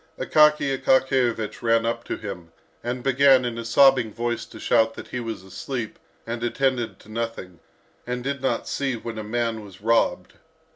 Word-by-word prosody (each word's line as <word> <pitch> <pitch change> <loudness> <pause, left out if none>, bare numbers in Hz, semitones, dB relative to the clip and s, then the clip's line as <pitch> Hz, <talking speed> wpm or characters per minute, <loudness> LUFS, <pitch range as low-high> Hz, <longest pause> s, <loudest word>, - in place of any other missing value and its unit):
Akaky 150 -3 +4
Akakiyevich 130 -5 +1
ran 115 -1 +2
up 115 0 -2
to - - -3
him, 90 -6 -8 0.3
and 120 +1 -3
began 135 -1 +5
in 120 -1 -3
a - - -4
sobbing 125 0 +4
voice 120 +1 -3
to - - -12
shout 115 -1 +2
that - - -9
he 125 - -4
was 115 -5 -5
asleep, 110 +5 -6 0.3
and 115 0 -4
attended 120 -4 0
to - - -19
nothing, 110 -6 -5 0.5
and 125 0 -3
did 140 0 -3
not 130 -3 -1
see 135 -3 -1
when 115 -1 -6
a - - -4
man 115 0 -2
was 95 -2 -13
robbed. 115 +2 +1
115 Hz, 175 wpm, -24 LUFS, 110-130 Hz, 0.5 s, began